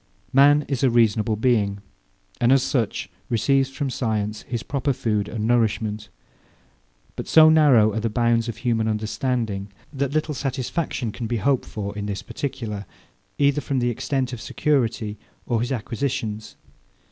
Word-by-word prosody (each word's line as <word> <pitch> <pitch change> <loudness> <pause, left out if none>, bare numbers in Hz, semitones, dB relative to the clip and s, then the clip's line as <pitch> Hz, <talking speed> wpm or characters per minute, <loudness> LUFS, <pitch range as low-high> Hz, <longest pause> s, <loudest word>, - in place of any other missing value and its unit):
Man 145 +2 +6
is 135 -3 -2
a 130 - +5
reasonable 110 -2 +2
being; 105 -3 +1 0.6
and 120 +1 +3
as 135 -1 +5
such, 120 -6 -1 0.2
receives 135 +3 +2
from 135 0 -3
science 110 -4 -2
his 120 -4 -5
proper 140 0 -1
food 105 -4 -1
and 110 -2 -3
nourishment: 110 -2 0 1.1
But - - -6
so 155 -1 +7
narrow 130 -9 +5
are 110 - -1
the 115 +1 -1
bounds 115 +1 +1
of 115 - -5
human 115 -2 0
understanding, 110 -2 -2 0.2
that 140 -1 -1
little 155 +1 -1
satisfaction 135 -1 -2
can 115 +1 -5
be 120 +1 -1
hoped 135 +5 +1
for 100 -1 -5
in 105 0 -4
this 100 -1 -4
particular, 125 -8 -5 0.5
either 140 0 +2
from 140 - -2
the 120 -1 +1
extent 130 +2 -2
of 115 - -6
security 120 -6 -1 0.3
or 115 -2 0
his 120 - -2
acquisitions. 115 -3 -3
120 Hz, 155 wpm, -23 LUFS, 110-135 Hz, 1.1 s, so